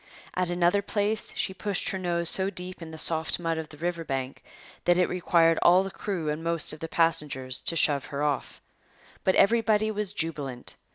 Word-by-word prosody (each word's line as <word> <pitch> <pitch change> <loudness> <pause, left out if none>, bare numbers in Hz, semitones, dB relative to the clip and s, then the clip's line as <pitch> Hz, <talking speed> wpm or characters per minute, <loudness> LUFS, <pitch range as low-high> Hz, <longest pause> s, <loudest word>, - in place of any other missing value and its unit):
At 180 -1 0
another 175 +3 +2
place 205 +1 -1
she 190 - -2
pushed 200 0 -2
her 190 - -3
nose 170 -2 0
so 190 +3 +3
deep 180 -1 -6
in 165 - -7
the 160 - -9
soft 160 0 +2
mud 165 -1 -1
of 155 -1 -6
the 150 - -13
riverbank 155 -6 -3 0.4
that 175 0 +4
it 180 - +3
required 165 -2 +3
all 180 +2 +6
the 195 - -5
crew 180 -5 -4
and 150 +2 -2
most 165 -2 +1
of 155 - -9
the 165 - -5
passengers 150 -7 +1
to 165 - 0
shove 145 -4 +2
her 140 +1 -4
off. 145 -2 -2 0.6
But 190 - +2
everybody 220 -1 +3
was 210 -2 -3
jubilant. 145 -9 -5
170 Hz, 190 wpm, -27 LUFS, 155-190 Hz, 0.6 s, all